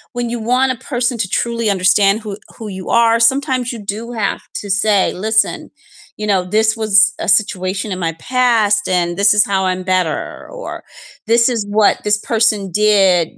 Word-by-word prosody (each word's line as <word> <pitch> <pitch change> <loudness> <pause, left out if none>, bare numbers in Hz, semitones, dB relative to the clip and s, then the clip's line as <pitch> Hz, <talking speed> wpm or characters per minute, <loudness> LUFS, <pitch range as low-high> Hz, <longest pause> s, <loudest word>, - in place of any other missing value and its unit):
when 245 0 -2
you 240 - -3
want 260 +1 +2
a 240 - -15
person 245 0 0
to 190 - -2
truly 235 -1 -2
understand 195 +1 +3
who 215 - -6 0.3
who 225 - -8
you 185 - -8 0.2
are, 230 0 +3
sometimes 265 -2 -2
you 235 - -7 0.2
do 225 - -7 0.2
have - - -2 0.2
to 205 - -9 0.2
say, 210 -3 +3 0.3
"Listen, 220 0 +1 0.6
you 210 - -3
know, 190 -2 +2 0.2
this 220 0 +3
was 215 -2 -3 0.3
a - - -3
situation 190 -1 -5
in 185 - -6
my 165 - -3 0.2
past 235 -5 +2
and 175 -1 0
this 200 0 +5
is 210 - +6
how 190 -1 +1
I'm 185 0 -3
better," 175 -4 -1 0.4
or, - - -6 0.6
"This 235 0 +5
is 230 - -2 0.2
what 215 - +4
this 210 0 +1
person 220 -2 +3 0.3
did 195 -4 +4
215 Hz, 185 wpm, -16 LUFS, 195-235 Hz, 0.6 s, is